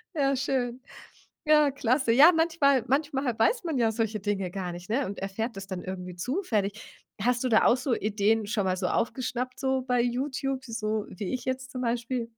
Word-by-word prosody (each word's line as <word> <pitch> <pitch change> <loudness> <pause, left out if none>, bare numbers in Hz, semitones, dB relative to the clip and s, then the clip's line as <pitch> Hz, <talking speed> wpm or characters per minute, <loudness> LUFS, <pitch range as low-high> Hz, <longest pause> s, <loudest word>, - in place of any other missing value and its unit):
Ja, 275 -2 +2
schön. 255 -2 -1 0.6
Ja, 300 -2 +5
klasse. 255 -2 +1
Ja, 300 +8 +8
manchmal 310 -7 +3
manchmal 270 -3 0
weiß 410 - +2
man 320 -5 -2
ja 225 -2 +3
solche 220 -2 -1
Dinge 195 -3 -2
gar 180 -2 -4
nicht, 175 +2 -9
ne, 260 +5 +1
und 200 - -6
erfährt 200 +4 -4
das 195 0 -7
dann 185 -2 -5
irgendwie 180 -1 -6
zufällig. 215 - -3 0.2
Hast 245 +3 +1
du - - +2
da 220 - +4
auch 245 - +5
so 260 0 -2
Ideen 210 +1 +1
schon 210 -2 -1
mal 185 0 0
so 185 -1 -1
aufgeschnappt, 255 +3 -2
so, 265 -1 0
bei 250 -1 +1
YouTube, 260 +2 -2
so 220 -3 -2
wie 195 +6 -5
ich 250 - -4
jetzt 260 0 -3
zum 255 -1 -4
Beispiel? 235 0 -2
240 Hz, 195 wpm, -27 LUFS, 210-265 Hz, 0.6 s, Ja